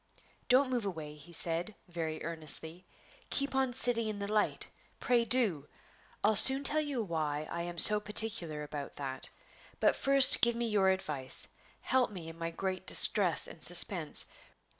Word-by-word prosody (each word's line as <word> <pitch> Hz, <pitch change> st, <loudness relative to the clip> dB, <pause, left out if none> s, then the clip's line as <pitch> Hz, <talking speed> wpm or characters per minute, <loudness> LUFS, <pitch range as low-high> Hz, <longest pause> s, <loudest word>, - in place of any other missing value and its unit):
"Don't 260 Hz, +1 st, +2 dB
move 240 Hz, -5 st, -3 dB
away," 160 Hz, -5 st, -8 dB
he 150 Hz, +3 st, -16 dB
said, 170 Hz, +4 st, +2 dB
very 165 Hz, -3 st, -7 dB
earnestly; 165 Hz, +2 st, -3 dB, 0.4 s
"keep 275 Hz, -1 st, 0 dB
on 265 Hz, -1 st, -1 dB
sitting 240 Hz, -2 st, -1 dB
in 215 Hz, -1 st, -6 dB
the 200 Hz, -, -6 dB
light; 210 Hz, 0 st, -2 dB, 0.3 s
pray 240 Hz, -1 st, 0 dB
do! 220 Hz, -, -1 dB, 0.6 s
I'll 215 Hz, +1 st, +1 dB
soon 265 Hz, +6 st, +7 dB
tell 310 Hz, +2 st, 0 dB
you 280 Hz, -6 st, -5 dB
why 155 Hz, -4 st, -5 dB
I 170 Hz, -, -5 dB
am 175 Hz, 0 st, -8 dB
so 210 Hz, +5 st, +7 dB
particular 210 Hz, -8 st, -2 dB
about 145 Hz, -1 st, -9 dB
that. 135 Hz, -2 st, -8 dB, 0.5 s
But -, -, +1 dB
first 275 Hz, -1 st, +6 dB
give 235 Hz, 0 st, +2 dB
me 235 Hz, 0 st, -4 dB
your 200 Hz, -3 st, 0 dB
advice; 150 Hz, -8 st, -1 dB, 0.3 s
help 260 Hz, -1 st, -1 dB
me 180 Hz, -6 st, -11 dB
in 165 Hz, 0 st, -14 dB
my 165 Hz, 0 st, -5 dB
great 185 Hz, +2 st, -6 dB
distress 185 Hz, -6 st, +4 dB
and 160 Hz, -, -8 dB
suspense. 175 Hz, -2 st, +2 dB
190 Hz, 160 wpm, -30 LUFS, 160-235 Hz, 0.6 s, soon